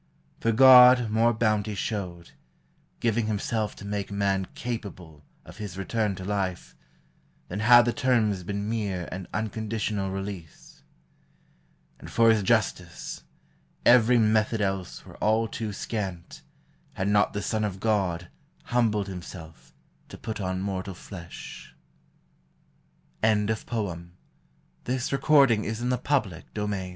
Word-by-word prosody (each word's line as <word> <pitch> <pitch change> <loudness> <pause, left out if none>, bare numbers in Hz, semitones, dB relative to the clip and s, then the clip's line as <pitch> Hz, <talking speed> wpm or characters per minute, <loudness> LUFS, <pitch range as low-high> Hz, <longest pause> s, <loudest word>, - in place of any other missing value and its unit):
For 115 - +1
God 125 -1 +8
more 115 +2 +3
bounty 110 -2 0
showed, 90 -5 -4 0.7
Giving 115 -1 0
himself 110 0 -2
to 100 - -11
make 100 0 -4
man 100 -2 0
capable 95 -10 -6 0.2
Of - - -13
his 100 -4 -7
return 105 +1 -1
to 95 - -8
life, 95 -3 -3 0.7
than 100 - -4
had 120 +2 +7
the 120 - 0
terms 115 -8 +1
Been 100 +3 -4
mere 100 -6 -2
and 90 -1 -6
unconditional 110 -2 -2
release. 95 -4 -8 1.2
And - - -10
for 115 -1 +5
his 110 -2 +2
justice, 95 - -1 0.6
every 120 0 +6
method 110 0 +2
else 95 -3 -3
Were - - -13
all 110 +1 +2
too 110 0 -4
scant, 100 -4 -5 0.5
had 95 - -2
not 105 0 +3
the 100 - -3
Son 110 +1 -1
of 100 -3 -3
God 95 -6 0 0.4
Humbled 110 -4 +1
himself 85 -3 -10 0.4
to - - -10
put 110 -2 -5
on 95 0 -2
mortal 95 -1 -4
f 85 -1 -10
105 Hz, 110 wpm, -26 LUFS, 95-110 Hz, 1.2 s, God